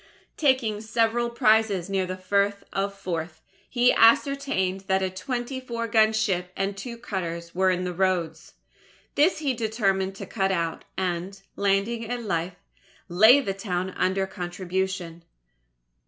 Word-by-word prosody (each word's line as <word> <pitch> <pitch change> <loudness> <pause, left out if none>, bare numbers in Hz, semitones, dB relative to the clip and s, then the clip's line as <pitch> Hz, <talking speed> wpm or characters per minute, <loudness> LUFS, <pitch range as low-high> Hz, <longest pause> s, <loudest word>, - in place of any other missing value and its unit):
Taking 255 -8 +1
several 230 +2 +1
prizes 215 -5 +2
near 195 -2 -1
the 185 0 -4
Firth 200 +2 0
of 195 +1 -1
Forth, 170 -4 -5 0.3
he 245 0 +4
ascertained 225 -6 +3
that 190 0 +2
a 190 - -1
twenty 245 +6 -4
four 235 -2 -4
gun 220 -1 +4
ship 190 -5 -1
and 195 +1 -1
two 235 +4 -7
cutters 170 -7 -5
were 185 +1 +2
in 185 0 0
the 180 -1 -3
roads. 180 -3 -1 0.6
These 315 +6 +3
he 285 -4 0
determined 200 -5 0
to - - -7
cut 195 -3 -1
out, 165 -3 -2
and, 185 +1 -2 0.2
landing 205 +3 0
at 245 -1 -3
Leith, 175 -3 -2 0.5
lay 220 +10 +7
the 195 -7 -2
town 190 -2 -3
under 190 +1 0
contribution. 180 -2 -4
195 Hz, 140 wpm, -25 LUFS, 185-225 Hz, 0.6 s, lay